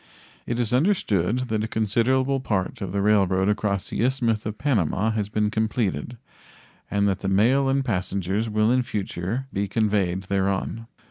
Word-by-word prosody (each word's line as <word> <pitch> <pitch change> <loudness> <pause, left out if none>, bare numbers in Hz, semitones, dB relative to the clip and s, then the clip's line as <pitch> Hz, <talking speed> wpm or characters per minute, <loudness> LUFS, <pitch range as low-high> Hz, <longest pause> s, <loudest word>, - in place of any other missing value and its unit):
It 120 0 -2
is 120 -1 0
understood 125 - +1
that 110 -1 0
a - - -2
considerable 125 +5 +1
part 100 -7 -2
of 95 -2 -4
the 100 +1 -1
railroad 95 -2 +3
across 100 -2 -1
the - - -2
Isthmus 120 -5 0
of 105 0 -5
Panama 110 - +1
has 105 -2 -2
been 105 0 0
completed, 110 - -1 0.7
and 100 0 +1
that 95 -2 0
the 95 - -4
mail 120 +8 +3
and 135 0 +1
passengers 100 0 -1
will 110 +1 +2
in 130 0 +3
future 105 +2 -3
be 100 +1 -1
conveyed 100 -3 0
thereon. 100 +4 -1
105 Hz, 160 wpm, -24 LUFS, 100-120 Hz, 0.7 s, railroad